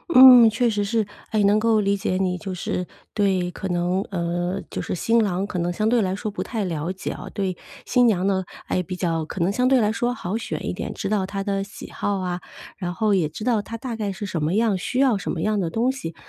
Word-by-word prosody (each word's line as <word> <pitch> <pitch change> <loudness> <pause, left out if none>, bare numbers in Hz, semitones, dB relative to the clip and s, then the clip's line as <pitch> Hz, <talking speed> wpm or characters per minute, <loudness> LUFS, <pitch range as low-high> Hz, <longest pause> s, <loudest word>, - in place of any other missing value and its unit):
嗯， 255 -3 +10
确 235 +3 +1
实 205 -2 0
是。 220 +1 +1 0.3
哎， 215 -2 +2
能 205 +1 +4
够 220 -1 +3
理 200 0 +1
解 185 -1 -1
你。 185 -1 0
就 190 0 -6
是 180 0 -3 0.3
对 190 -4 +1
可 190 - -5
能 180 +1 0
呃， 175 +1 -2
就 - - -3
是 - - -3
新 230 +6 +2
郎， 195 -2 0
可 185 -3 -4
能 175 +1 0
相 215 +4 +1
对 240 0 +3
来 190 -2 0
说 210 +1 -4
不 205 - -5
太 225 -4 -3
了 170 -1 -2
解 190 - -5
哦。 - - -7
对 190 -4 -2 0.3
新 245 -1 +4
娘 190 -5 +2
呢， 190 -1 +1 0.2
哎， 180 - 0
比 185 +1 -5
较 165 -3 -1
可 180 - -5
能 175 +3 +2
相 250 +5 +1
对 260 -2 +4
来 210 - +2
说 240 +2 0
好 205 -2 -3
选 230 - -4
一 - - -1
点， - - -5
知 195 - -4
道 205 -3 +1
她 195 0 -4
的 195 -1 -1
喜 205 +2 -9
好 200 -1 -1
啊， 180 -1 -2 0.4
然 175 -2 -3
后 215 +2 +1
也 180 -5 +2
知 160 +8 -8
道 230 -4 +2
她 230 +2 -7
大 235 0 -5
概 210 -2 -2
是 205 - -6
什 175 -5 -3
么 155 +4 0
样， 215 -1 +2
需 215 +7 -3
要 255 -6 +4
什 - - -5
么 160 - -2
样 215 +2 +1
的 175 -4 -1
东 235 +8 +1
西。 170 -12 -6
200 Hz, 275 characters per minute, -23 LUFS, 180-220 Hz, 0.4 s, 嗯